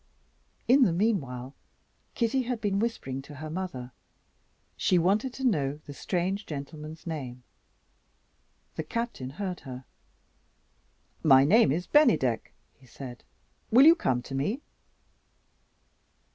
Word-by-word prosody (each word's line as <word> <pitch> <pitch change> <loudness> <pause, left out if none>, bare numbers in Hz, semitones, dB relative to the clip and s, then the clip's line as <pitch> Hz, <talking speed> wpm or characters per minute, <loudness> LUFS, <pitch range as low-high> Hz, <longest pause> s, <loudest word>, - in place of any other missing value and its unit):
In 270 +3 +6
the 225 -9 +5
meanwhile, 145 - -1 0.6
Kitty 240 +2 +1
had 250 -2 -3
been 200 -2 0
whispering 135 - -2
to 145 +2 -12
her 155 +2 -7
mother. 155 -9 -5 0.8
She 185 - +2
wanted 200 +9 +2
to 265 - -6
know 150 - +1
the 145 - -8
strange 185 +6 -2
gentleman's 150 +2 -7
name. 130 -7 -6 1.3
The 160 - -2
Captain 230 - -4
heard 185 +4 -4
her. 130 -1 -9 1.4
"My 135 -3 +7
name 205 - +5
is 175 +5 -1
Bennydeck," 225 - +3 0.2
he 130 - -22
said; 120 +1 -9 0.5
"will 255 +5 +7
you 325 - +10
come 130 - -1
to 135 - -9
me?" 200 - -1
160 Hz, 120 wpm, -28 LUFS, 135-220 Hz, 1.4 s, you